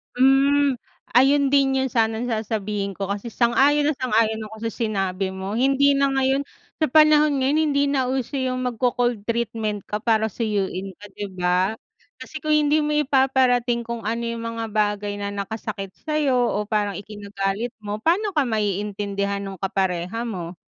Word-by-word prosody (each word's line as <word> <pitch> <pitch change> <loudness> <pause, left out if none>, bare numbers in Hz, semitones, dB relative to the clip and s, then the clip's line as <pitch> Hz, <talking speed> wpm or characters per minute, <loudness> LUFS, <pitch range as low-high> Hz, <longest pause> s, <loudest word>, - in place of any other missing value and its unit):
Hmm, 270 +1 +4 0.4
ayun 275 +1 +4
din 275 -1 +3
'yon 265 0 0
sanang 225 +1 0
sasabihin 210 -3 -2
ko, 195 0 -4
kasi 205 +3 -4
sang-ayon 270 +6 +3
na 305 - +1
sang-ayon 225 -4 +1
ako 220 +1 -5
sa - - -10
sinabi 195 -4 -2
mo. 190 +3 -4
Hindi 275 +2 +3
na 275 - +3
ngayon 270 +1 +1 0.3
sa 310 - +3
panahon 300 -1 +5
ngayon 280 +4 +2
hindi 280 - +3
na 270 -2 +1
uso 265 +1 -2
yung 255 -1 -1
magco-cold 245 -2 0
treatment 225 -3 -2
ka 210 - -1
para 220 -1 +1
suyuin 195 -4 -2
ka, 205 - -9
di 205 - -6
ba? 180 +3 +1 0.4
Kasi 310 - -9
kung 310 - -4
hindi 300 +1 +3
mo 300 0 -1
ipaparating 260 -4 +2
kung 235 0 -5
ano 230 +2 -2
yung 230 0 -4 0.2
mga 225 - -2
bagay 205 -1 0
na 200 - -2
nakasakit 200 -1 -5
sa 305 -1 -1
'yo 285 -3 +2
o 220 -4 0
parang 205 -3 -1
ikinagalit 205 +2 -4
mo, 210 +1 -5
paano 390 - +1
ka 300 - +3
maiintindihan 200 -2 -2
nung 195 -1 -7
kapareha 190 +3 -1
mo, 180 -6 -6
230 Hz, 165 wpm, -23 LUFS, 205-270 Hz, 0.4 s, panahon